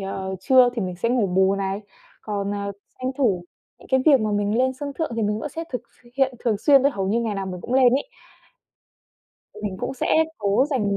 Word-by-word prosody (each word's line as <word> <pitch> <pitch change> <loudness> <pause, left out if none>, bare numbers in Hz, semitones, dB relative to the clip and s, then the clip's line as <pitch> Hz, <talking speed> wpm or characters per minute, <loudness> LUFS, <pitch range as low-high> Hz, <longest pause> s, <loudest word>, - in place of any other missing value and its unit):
ờ, 190 0 -4
trưa 255 +4 +5
thì 225 - -2
mình 180 -1 -4
sẽ 230 - -1
ngủ 240 -4 +2
bù 190 +1 +3
này. 195 0 -2 0.4
Còn, 200 -2 -3
ờ, 200 0 -3 0.3
tranh 255 0 -2
thủ 195 -10 +1 0.3
những - - -17
cái 265 0 +3
việc 280 -5 +6
mà 215 0 0
mình 205 +2 0
lên 260 +1 +2
sân 285 -1 -4
thượng 320 - -1
thì 225 - 0
mình 210 0 0
vẫn 300 - -4
sẽ 325 +4 -6
thực 250 - -2 0.2
s - - -23
hiện 270 -2 +2
thường 225 -3 +2
xuyên 275 +3 +5
đấy, 280 0 +3
hầu 195 -3 -2
như 225 +4 +1
ngày 225 -3 -2
nào 195 -1 -3
mình 180 -1 -6
cũng 240 - -4
lên 255 -2 +5
ấy. 280 - +1 1.6
Mình 200 -3 -4
cũng - - -3
sẽ - - -2 0.3
cố 205 +4 +2
dành 210 -8 0
215 Hz, 235 wpm, -23 LUFS, 195-260 Hz, 1.6 s, việc